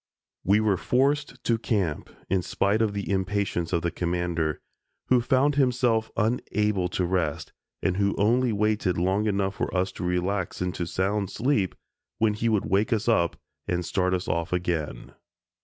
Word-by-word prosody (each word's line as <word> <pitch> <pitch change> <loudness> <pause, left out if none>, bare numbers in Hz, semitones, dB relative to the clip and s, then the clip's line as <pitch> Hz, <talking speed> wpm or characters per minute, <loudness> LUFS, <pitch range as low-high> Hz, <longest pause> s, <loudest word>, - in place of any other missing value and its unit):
We 100 +3 +4
were 105 -3 +2
forced 135 +2 0
to 115 -1 +1
camp, 95 -10 -1 0.2
in 95 0 +1
spite 100 +4 +1
of 110 -2 +1
the 100 - -3
impatience 95 -3 -1
of 85 -2 0
the 85 - 0
Commander, 85 -3 -1 0.5
who 125 -1 +5
found 130 +4 +2
himself 125 -4 +2
unable 105 -4 0
to 90 +1 -1
rest, 85 -5 -1 0.3
and 95 -1 +1
who 100 0 +1
only 120 +4 +3
waited 105 -3 +1
long 95 +5 +1
enough 100 -1 0
for - - -2
us 95 +1 0
to - - -7
relax 90 +1 -1
into 90 -1 -2
sound 95 +2 -1
sleep, 115 -7 0 0.4
when 110 -1 +2
he 115 +2 0
would 105 -3 +1
wake 100 +3 +1
us 110 -1 0
up 85 -8 +2 0.3
and 90 -1 -1
start 90 0 +1
us 90 - -4
off 85 -1 -1
again. 85 -4 -2
100 Hz, 165 wpm, -26 LUFS, 90-110 Hz, 0.5 s, who